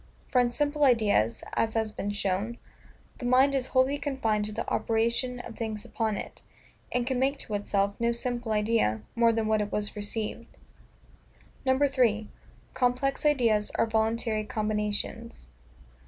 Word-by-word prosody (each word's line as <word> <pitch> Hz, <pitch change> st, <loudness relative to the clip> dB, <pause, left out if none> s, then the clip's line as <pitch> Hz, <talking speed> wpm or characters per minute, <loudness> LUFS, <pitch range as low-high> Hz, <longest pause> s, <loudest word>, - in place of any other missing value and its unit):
For 250 Hz, -, +4 dB
in 245 Hz, -, +2 dB
simple 295 Hz, +4 st, 0 dB
ideas 210 Hz, -, +3 dB
(as 225 Hz, 0 st, 0 dB
has 220 Hz, -1 st, 0 dB
been 205 Hz, -, -4 dB
shown) 205 Hz, +3 st, -1 dB, 0.6 s
the 245 Hz, -, -5 dB
mind 260 Hz, +3 st, +5 dB
is 260 Hz, -2 st, 0 dB
wholly 265 Hz, +2 st, +2 dB
confined 225 Hz, -7 st, 0 dB
to 210 Hz, -, -2 dB
the -, -, -4 dB
operation 235 Hz, +3 st, 0 dB
of 230 Hz, -2 st, -9 dB
things 220 Hz, -2 st, -4 dB
upon 220 Hz, -3 st, -1 dB
it, -, -, -8 dB, 0.5 s
and 245 Hz, -1 st, 0 dB
can 260 Hz, -1 st, -1 dB
make 275 Hz, +2 st, +1 dB
to 215 Hz, -, -7 dB
itself 200 Hz, -1 st, 0 dB
no 235 Hz, 0 st, +2 dB
simple 240 Hz, -1 st, -3 dB
idea, 210 Hz, -, +1 dB
more 235 Hz, 0 st, +4 dB
than 225 Hz, -1 st, 0 dB
what 215 Hz, 0 st, +2 dB
it 205 Hz, -, -3 dB
was 210 Hz, 0 st, -2 dB
received. 215 Hz, +2 st, -4 dB, 1.1 s
3. 260 Hz, -6 st, +2 dB, 0.4 s
Complex 260 Hz, +4 st, +1 dB
Ideas 230 Hz, -8 st, +2 dB
are -, -, +3 dB
voluntary 220 Hz, 0 st, 0 dB
Combinations. 210 Hz, -, -3 dB
230 Hz, 150 wpm, -28 LUFS, 210-250 Hz, 1.1 s, mind